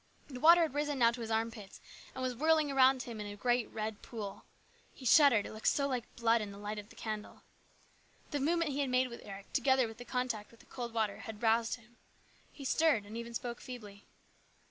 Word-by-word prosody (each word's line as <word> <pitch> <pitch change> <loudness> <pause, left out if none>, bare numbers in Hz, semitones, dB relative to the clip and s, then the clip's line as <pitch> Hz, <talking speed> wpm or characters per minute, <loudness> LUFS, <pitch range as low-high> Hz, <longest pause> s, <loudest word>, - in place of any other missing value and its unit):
The 255 -3 -7
water 335 +4 +7
had 310 -5 -1
risen 290 0 -1
now 235 -2 +5
to 235 0 -7
his 225 - -5
armpits, 225 -2 -3 0.4
and 260 - -4
was 255 -1 0
whirling 310 +2 +2
around 265 -1 +5
him 230 -3 -7
in 205 - -5
a 205 - -7
great 240 +2 +1
red 215 -1 -4
pool. 210 -4 -7 0.5
He 260 - -11
shuddered, 250 -5 +6
it - - -7
looked 215 - -4
so 280 -1 +3
like 250 -4 -4
blood 230 -1 +3
in 205 -1 -5
the 200 - -10
light 210 +1 -4
of 210 +1 -11
the - - -16
candle. 215 -1 -6 0.9
The 290 - -1
movement 330 +2 +1
he 275 - -3
had 275 -2 0
made 255 0 +2
with 235 - -9
Eric, 200 -1 -10
together 265 -3 +3
with 225 +1 -11
the - - -6
contact 245 -4 -2
with 230 - -20
the - - -18
cold 240 -2 -6
water, 220 -3 -1
had 220 +1 -8
roused 225 0 +3
him. 235 0 -21 0.5
He 280 - -10
stirred 290 -7 +3
and 210 +2 -9
even 235 0 -6
spoke 240 0 -4
feebly. 210 -5 -10
235 Hz, 225 wpm, -33 LUFS, 220-265 Hz, 0.9 s, water